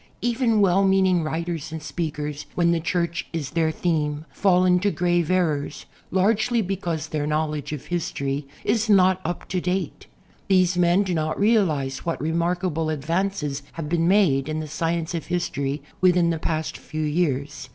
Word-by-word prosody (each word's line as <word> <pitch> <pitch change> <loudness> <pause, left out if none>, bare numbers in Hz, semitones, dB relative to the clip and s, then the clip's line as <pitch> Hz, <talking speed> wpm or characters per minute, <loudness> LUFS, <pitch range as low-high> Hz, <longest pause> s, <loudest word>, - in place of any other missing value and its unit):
Even 235 -2 +2
well 195 0 +4
meaning 190 -2 +3
writers 165 0 -3
and 160 - -4
speakers, 150 -1 -4
when 170 -1 +3
the 170 - +2
Church 170 0 -1
is 150 -4 -3
their 165 -1 +1
theme, 155 -2 -1
fall 185 -2 +3
into 180 +2 +3
grave 175 -1 +1
errors, 155 -6 0 0.2
largely 220 +5 +2
because 175 -6 -2
their 150 -1 -2
knowl 155 0 0
edge 150 -2 -5
of 150 -3 -6
history 140 -5 -2 0.2
is 225 -1 +1
not 185 -2 +5
"up 175 +2 -4
to 185 - -1
date." 185 +2 -3 0.4
These 185 -2 +3
men 175 +2 +3
do 185 -3 -2
not 155 -1 -1
realize 165 -12 +2
what 170 - -3
remarkable 170 0 -1
advances 155 -1 -1
have 160 -3 -5
been 165 0 +1
made 170 -8 +3
in 155 0 -2
the 155 - -5
science 165 +2 -2
of 165 - -4
history 145 -5 -2 0.2
within 180 -2 +4
the 165 - -2
past 155 -1 -2
few 155 0 -5
years. 145 -4 -1
170 Hz, 165 wpm, -24 LUFS, 155-185 Hz, 0.4 s, not